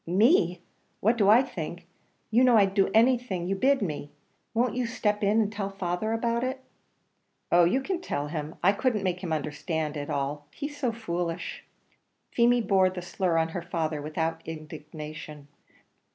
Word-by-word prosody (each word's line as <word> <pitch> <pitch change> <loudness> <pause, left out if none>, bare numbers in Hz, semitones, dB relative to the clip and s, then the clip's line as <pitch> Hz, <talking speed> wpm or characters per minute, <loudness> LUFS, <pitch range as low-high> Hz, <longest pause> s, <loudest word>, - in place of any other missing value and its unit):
"Me! 185 - +4 0.4
what 225 +4 +3
do 205 -4 +3
I 230 +5 +7
think? 265 - -6 0.5
you 240 +3 +5
know 250 -3 +6
I'd 195 -2 +4
do 195 -1 +3
anything 230 -5 +2
you 195 +2 0
bid 265 +4 +2
me. 150 -5 -4 0.4
Won't 235 0 +1
you 250 -1 0
step 210 -3 -1
in 205 +2 +3
and 210 -2 +1
tell 200 -2 -3
father 195 +2 -2
about 235 +1 0
it?" 260 +1 -2 0.9
"Oh, 175 0 +6
you 225 +11 +2
can 360 +5 -3
tell 145 - -2
him. 150 0 -5
I 190 - +6
couldn't 215 0 0
make 180 -1 -1
him 180 -3 -5
understand 155 +1 -2
it - - -3
at 145 - -6
all, 145 +1 -2
he's 290 0 -5
so 265 -5 0
foolish." 175 -7 -4 0.7
Feemy 240 0 +4
bore 190 -3 +3
the 180 -1 -6
slur 180 -1 0
on 160 0 +2
her 175 +1 -4
father 160 -3 -2
without 160 +2 -2
indignation. 155 -1 -8
190 Hz, 175 wpm, -27 LUFS, 160-230 Hz, 0.9 s, I